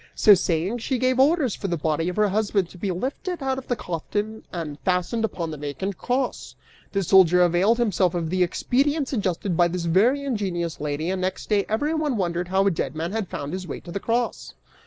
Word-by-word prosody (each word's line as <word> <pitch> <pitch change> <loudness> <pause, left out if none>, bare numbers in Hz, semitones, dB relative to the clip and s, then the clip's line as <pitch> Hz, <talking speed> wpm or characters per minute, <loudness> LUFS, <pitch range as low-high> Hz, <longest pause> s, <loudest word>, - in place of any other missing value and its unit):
So 210 - +7
saying, 185 +4 0
she 255 +3 -1
gave 255 +1 +1
orders 280 - +3
for 200 - -4
the 170 -2 -1
body 160 +2 0
of 180 - -5
her 210 -1 +3
husband 200 -3 0
to - - -13
be 200 - -2
lifted 275 - -3
out 265 0 0
of 260 - -13
the 245 - 0
coffin 210 +4 -4
and 155 -5 -5
fastened 185 +5 0
upon 170 -7 -2
the 155 - -6
vacant 170 +7 -4
cross! 250 +1 -2 0.4
The 195 -1 0
soldier 180 -1 +6
availed 180 +6 +3
himself 195 -6 +1
of 165 -2 -2
the 185 0 +1
expedient 275 - +1
suggested 195 - -1
by 175 +1 +4
this 175 0 -3
very 225 +12 +3
ingenious 185 - -2
lady 150 +3 -2
and 190 -1 -2
next 185 +1 -3
day 205 -2 +2
everyone 295 +3 0
wondered 175 -2 -1
how 190 +2 +2
a 200 - +4
dead 155 -4 -3
man 165 +3 -3
had 220 -2 -2
found 145 +3 -5
his 185 -1 -5
way - - -5
to 175 - -10
the 200 - -3
cross!" 235 +3 -2
190 Hz, 215 wpm, -24 LUFS, 175-235 Hz, 0.4 s, So